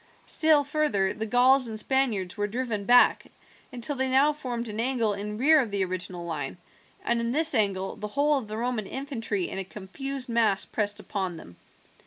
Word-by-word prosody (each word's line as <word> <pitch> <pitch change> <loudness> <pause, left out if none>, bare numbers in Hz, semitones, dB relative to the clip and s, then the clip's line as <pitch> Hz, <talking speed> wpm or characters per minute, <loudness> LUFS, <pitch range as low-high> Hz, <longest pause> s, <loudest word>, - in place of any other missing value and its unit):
Still 310 -2 +3
further 285 -10 0
the 220 +1 -5
Gauls 255 +2 +4
and 220 -1 -4
Spaniards 220 -8 0
were 205 -1 -1
driven 225 -2 -3
back 245 +2 +5 0.4
until 250 +3 -3
they 265 0 0
now 275 +3 +4
formed 245 -5 -5
an 215 0 -5
angle 230 -3 +1
in 210 +1 -5
rear 305 +6 +5
of 245 -5 0
the 200 -1 0
original 180 -1 -5
line, 155 -3 -4 0.5
and 235 0 +1
in 235 0 -1
this 315 +1 +2
angle 195 -4 +1
the 210 - -6
whole 285 +5 +1
of 230 - -9
the 215 +1 -5
Roman 235 -3 -2
infantry 235 -8 -3
in - - -5
a - - -2
confused 255 +8 -6
mass 225 -5 +1
pressed 205 -1 -2
upon 190 -4 -4
them. 85 - -13
230 Hz, 190 wpm, -27 LUFS, 200-265 Hz, 0.5 s, back